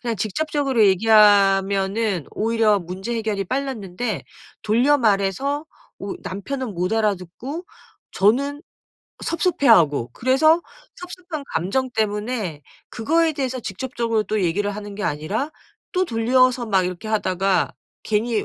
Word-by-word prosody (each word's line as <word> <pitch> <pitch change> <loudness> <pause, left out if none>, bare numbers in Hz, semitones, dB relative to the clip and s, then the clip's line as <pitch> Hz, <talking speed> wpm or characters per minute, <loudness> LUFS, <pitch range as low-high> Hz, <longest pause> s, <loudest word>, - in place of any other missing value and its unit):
그냥 235 -3 -2
직접적으로 270 - 0
얘기하면은 195 -2 +3
오히려 220 -2 +2
문제 190 +6 -5
해결이 215 -3 -2
빨랐는데 235 -4 -3 0.4
돌려 245 +7 +3
말해서 230 - +1 0.3
우 200 - -5
남편은 235 +4 -5
못 180 +3 -1
알아듣고 220 - -2 0.5
저는 275 +8 +2 0.6
섭섭해하고 220 - +3
그래서 310 - +3 0.4
섭섭한 360 -4 -7
감정 200 +11 0
때문에 210 -6 -2 0.3
그거에 325 +8 +1
대해서 260 -3 -3
직접적으로 230 +1 -2
또 215 -2 -1
얘기를 200 +4 0
하는 205 -1 -7
게 205 - -4
아니라 195 - -2 0.4
또 370 0 +2
돌려서 250 -1 +2
막 195 -4 +2
이렇게 180 +4 -6
하다가 195 -3 +1 0.3
괜히 220 0 0
220 Hz, 295 characters per minute, -22 LUFS, 195-260 Hz, 0.6 s, 얘기하면은